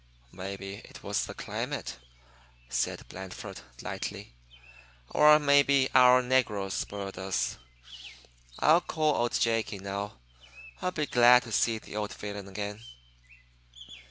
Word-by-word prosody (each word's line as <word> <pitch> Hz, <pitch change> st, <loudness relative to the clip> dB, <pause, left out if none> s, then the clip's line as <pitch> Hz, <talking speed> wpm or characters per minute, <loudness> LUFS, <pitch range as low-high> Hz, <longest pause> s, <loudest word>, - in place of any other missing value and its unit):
"Maybe 95 Hz, +1 st, -6 dB
it -, -, -13 dB
was -, -, -1 dB
the -, -, -8 dB
climate," -, -, -4 dB, 0.7 s
said -, -, -2 dB
Blandford, 95 Hz, 0 st, -8 dB, 0.2 s
lightly, -, -, -6 dB, 0.8 s
"or 150 Hz, 0 st, +7 dB
maybe 140 Hz, -2 st, +4 dB
our 125 Hz, 0 st, +7 dB
negroes 105 Hz, -7 st, +1 dB
spoiled 100 Hz, -1 st, -4 dB
us. 95 Hz, -7 st, -2 dB, 1.0 s
I'll 165 Hz, +3 st, +5 dB
call 155 Hz, -3 st, 0 dB
old 120 Hz, -3 st, 0 dB
Jake 115 Hz, -1 st, +1 dB
in, 95 Hz, -1 st, -8 dB
now. 100 Hz, -2 st, -5 dB, 0.6 s
I'll 180 Hz, -, 0 dB
be 155 Hz, -4 st, -2 dB
glad 125 Hz, -1 st, +6 dB
to 115 Hz, -, -10 dB
see 115 Hz, +1 st, +2 dB
the 105 Hz, -, -9 dB
old 105 Hz, -1 st, -3 dB
villain 100 Hz, -1 st, -7 dB
again." 105 Hz, +2 st, -5 dB
110 Hz, 125 wpm, -29 LUFS, 100-130 Hz, 1.0 s, or